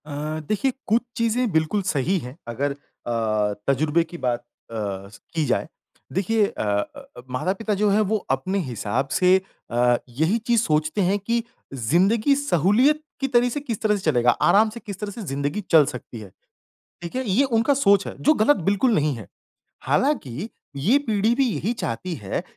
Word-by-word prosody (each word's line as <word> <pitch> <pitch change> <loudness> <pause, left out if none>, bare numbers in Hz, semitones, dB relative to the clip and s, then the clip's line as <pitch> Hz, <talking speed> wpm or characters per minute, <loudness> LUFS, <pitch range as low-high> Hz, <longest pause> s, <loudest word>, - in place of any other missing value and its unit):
अ, 150 +1 -4
देखिए 215 +6 +1 0.2
कुछ 230 +2 +3
चीज़ें 230 0 +1
बिल्कुल 160 +6 +1
सही 160 +7 +1
है 125 0 -9
अगर 135 +5 -1 0.4
अ, 110 -3 0
तजुर्बे 150 +4 +2
की 170 +1 -10
बात 125 -5 -1 0.3
अ, - - -9
स 100 -1 -5 0.2
की 160 -2 +1
जाए। - - 0 0.5
देखिए 210 +3 +2
अ - - -5 0.3
अ, 275 - -12
माता-पिता 190 - -1
जो 205 +1 +2
है, 205 +2 +3
वो 215 +1 +1
अपने 185 +10 0
हिसाब 120 +3 -2
से 185 +1 +6 0.3
अ, 120 0 +3
यही 160 - +1
चीज़ 235 -2 +4
सोचते 155 0 0
है 190 +2 +2
कि 230 +4 -1 0.3
ज़िंदगी 190 - +2
सहूलियत 260 - +3 0.2
की 270 - 0
तरह 245 -1 +3
से 270 - -3
किस 245 -7 -5
तरह 215 -1 +2
से - - -7
चलेगा, 120 -2 +4
आराम 215 - +4
से 230 +2 -9
किस 200 -5 -8
तरह 210 -1 -4
से 225 - -8
ज़िंदगी 145 +2 -2
चल 160 -4 +7
सकती 125 -2 -7
है। 100 -3 -11 0.7
ठीक 170 - -7
है 260 - -1
ये 235 +9 +4
उनका 240 +1 +2
सोच 200 -7 +3
है, - - -5
जो 310 - +4
ग़लत 290 +3 +4
बिल्कुल 215 +4 +3
नहीं 150 -4 +1
है, 110 -5 -9 0.6
हालाँकि 210 - 0 0.3
ये 195 - +3
पीढ़ी 215 +1 +2
भी 270 +1 +3
यही 220 +1 -1
चाहती 170 +10 -3
है 100 -8 -3
190 Hz, 180 wpm, -23 LUFS, 135-225 Hz, 0.7 s, चल